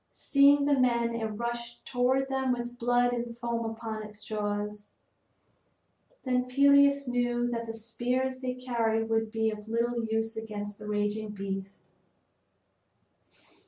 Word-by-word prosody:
Seeing 280 Hz, 0 st, +5 dB
the 290 Hz, -, +3 dB
men 235 Hz, -2 st, +2 dB
it 230 Hz, -1 st, -2 dB
rushed 235 Hz, +2 st, -5 dB
toward 260 Hz, +2 st, +1 dB
them 265 Hz, -1 st, 0 dB
with 240 Hz, 0 st, -5 dB
blood 245 Hz, +1 st, +3 dB
and 235 Hz, -1 st, -4 dB
foam 235 Hz, -1 st, -2 dB
upon 225 Hz, -1 st, -5 dB
its 210 Hz, 0 st, -11 dB
jaws. 210 Hz, -1 st, -3 dB, 1.3 s
Then 250 Hz, -1 st, +1 dB
Peleus 280 Hz, +1 st, +5 dB
knew 245 Hz, 0 st, +1 dB
that 230 Hz, -1 st, -3 dB
the 225 Hz, -, -4 dB
spears 250 Hz, +3 st, -2 dB
they 255 Hz, -1 st, -3 dB
carried 230 Hz, -3 st, 0 dB
would 225 Hz, 0 st, +1 dB
be 220 Hz, 0 st, 0 dB
of 210 Hz, 0 st, -8 dB
little 235 Hz, +1 st, 0 dB
use 225 Hz, 0 st, -1 dB
against 210 Hz, -2 st, -6 dB
the 210 Hz, -, -8 dB
raging 210 Hz, +1 st, -1 dB
beast. 195 Hz, -1 st, -5 dB
235 Hz, 135 wpm, -29 LUFS, 220-250 Hz, 1.3 s, Seeing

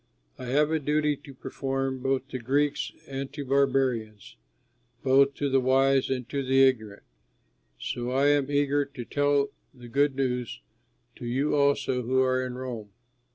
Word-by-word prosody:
I 130 Hz, -, -6 dB
have 145 Hz, +5 st, +2 dB
a 160 Hz, -, +1 dB
duty 150 Hz, +1 st, +1 dB
to 140 Hz, 0 st, -13 dB
perform 135 Hz, 0 st, -3 dB
both 135 Hz, 0 st, -1 dB
to 130 Hz, -, -5 dB
Greeks 140 Hz, +4 st, 0 dB, 0.2 s
and 135 Hz, 0 st, -5 dB
to 145 Hz, -1 st, -5 dB
barbarians; 130 Hz, -6 st, 0 dB, 0.7 s
both 135 Hz, +1 st, +4 dB
to 145 Hz, -, -1 dB
the 135 Hz, -1 st, +3 dB
wise 135 Hz, +1 st, +3 dB
and 125 Hz, -2 st, -2 dB
to 140 Hz, -1 st, -2 dB
the 135 Hz, +1 st, +4 dB
ignorant; 110 Hz, -6 st, +1 dB, 0.7 s
so 120 Hz, 0 st, -4 dB
I 135 Hz, +3 st, +3 dB
am 145 Hz, -1 st, +2 dB
eager 145 Hz, 0 st, +2 dB
to 140 Hz, -3 st, -9 dB
tell 145 Hz, +1 st, +1 dB, 0.2 s
the 120 Hz, -1 st, -12 dB
good 140 Hz, +2 st, +2 dB
news 125 Hz, -, -2 dB, 0.6 s
to 120 Hz, -, -7 dB
you 135 Hz, +5 st, 0 dB
also 140 Hz, -3 st, +2 dB
who 130 Hz, +2 st, 0 dB
are 130 Hz, 0 st, +1 dB
in 125 Hz, -1 st, -5 dB
Rome. 125 Hz, -5 st, -6 dB
135 Hz, 160 wpm, -27 LUFS, 125-140 Hz, 0.7 s, both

